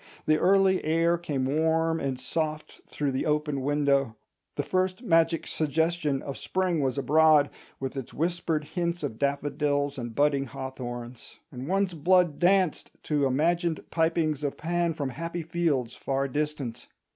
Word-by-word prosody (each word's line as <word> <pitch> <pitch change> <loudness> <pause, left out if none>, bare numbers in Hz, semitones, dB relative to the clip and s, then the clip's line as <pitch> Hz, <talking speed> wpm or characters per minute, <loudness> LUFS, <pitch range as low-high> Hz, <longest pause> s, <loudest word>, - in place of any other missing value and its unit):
The 155 0 +3
early 190 0 +4
air 165 +2 +2
came 145 -6 -2
warm 160 +3 +1
and 135 -2 -2
soft 155 +3 -3
through 145 -2 -2
the 130 - -1
open 150 -2 0
window; 140 -3 +1 0.4
the 145 - -1
first 185 - -1
magic 165 -5 +2
suggestion 155 -2 0
of 140 - -6
spring 185 -4 0
was 135 0 0
abroad, 150 +1 +4 0.3
with 135 +1 -4
its 135 -3 -6
whispered 165 -1 -1
hints 170 +2 -3
of 120 -6 -4
daffodils 145 0 0
and 120 -2 -6
budding 145 -1 +2
hawthorns; 120 -2 -7
and 130 +1 -7
one's 195 0 +1
blood 175 0 +3
danced 185 -2 +2
to 145 -3 +1
imagined 165 +4 +1
pipings 160 -3 +1
of 145 - -2
Pan 170 0 0
from 145 -4 -2
happy 165 +5 -5
fields 155 -7 0
far 135 0 -2
distant. 145 -3 -3
150 Hz, 145 wpm, -27 LUFS, 140-170 Hz, 0.4 s, early